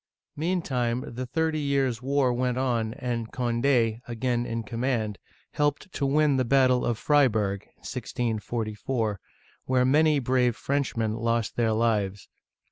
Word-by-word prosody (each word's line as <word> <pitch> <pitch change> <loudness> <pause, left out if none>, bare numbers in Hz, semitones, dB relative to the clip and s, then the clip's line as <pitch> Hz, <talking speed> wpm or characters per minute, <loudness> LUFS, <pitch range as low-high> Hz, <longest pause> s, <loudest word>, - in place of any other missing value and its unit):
Meantime, 135 -8 -1
the 125 +2 -4
Thirty 160 +4 0
Years' 135 -5 0
War 135 -1 +2
went 125 0 0
on, 120 -3 0
and 120 -4 -3
Cond6 120 -2 +1
— - - -28
again 120 0 -1
in 115 0 -3
command 115 -3 -2 0.2
— - - -35
helped 145 +6 0
to 140 - 0
win 145 0 +3
the 130 - +2
battle 130 0 +3
of 120 - 0
Freiburg 110 -9 +2
(1644), 110 -2 -3 0.5
where 130 -1 +2
many 150 +3 +4
brave 125 -2 +2
Frenchmen 125 -6 -1
lost 115 -1 -1
their 115 -2 +2
lives. 105 -3 0
125 Hz, 135 wpm, -26 LUFS, 115-135 Hz, 0.5 s, many